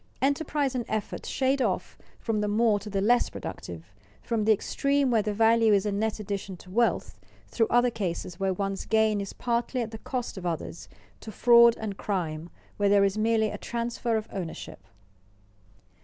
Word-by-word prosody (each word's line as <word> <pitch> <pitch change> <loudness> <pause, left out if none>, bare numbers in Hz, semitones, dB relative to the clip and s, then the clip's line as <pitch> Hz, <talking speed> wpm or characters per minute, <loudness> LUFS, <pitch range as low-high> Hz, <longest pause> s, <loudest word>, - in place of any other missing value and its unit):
Enterprise 280 0 0
and 250 -2 -1
effort 215 -1 -4
shade 265 0 +1
off - - -1 0.2
from 220 -2 -1
the 210 - 0
more 215 0 +2
to 210 - -9
the 195 -1 -1
less 240 +4 +3
productive, 85 +2 -8 0.3
from 225 -3 -1
the 220 - +5
extreme 275 +5 +1
where 225 -2 +3
the 210 0 -2
value 225 +1 +4
is 200 0 +2
a 210 - 0
net 215 +2 -1
addition 200 -2 -5
to 180 - -14
wealth, 235 +4 0 0.3
through 225 -2 +1
other 245 0 +3
cases 180 -4 -4
where 195 -1 +1
one's 195 +1 -3
gain 220 -2 +2
is 195 - -5
partly 240 +1 -1
at 230 -2 -3
the 220 - -8
cost 245 -6 -4
of 180 - -9
others, 165 0 -5 0.3
to 220 - -9
fraud 235 +1 +6
and 205 -3 -5
crime 170 -5 -3 0.3
where 205 -1 +2
there 200 0 +5
is 195 0 +2
merely 220 0 +2
a - - -6
transfer 235 -1 -2
of 215 0 -4
ownership. 180 -4 -6
220 Hz, 185 wpm, -27 LUFS, 200-235 Hz, 0.3 s, fraud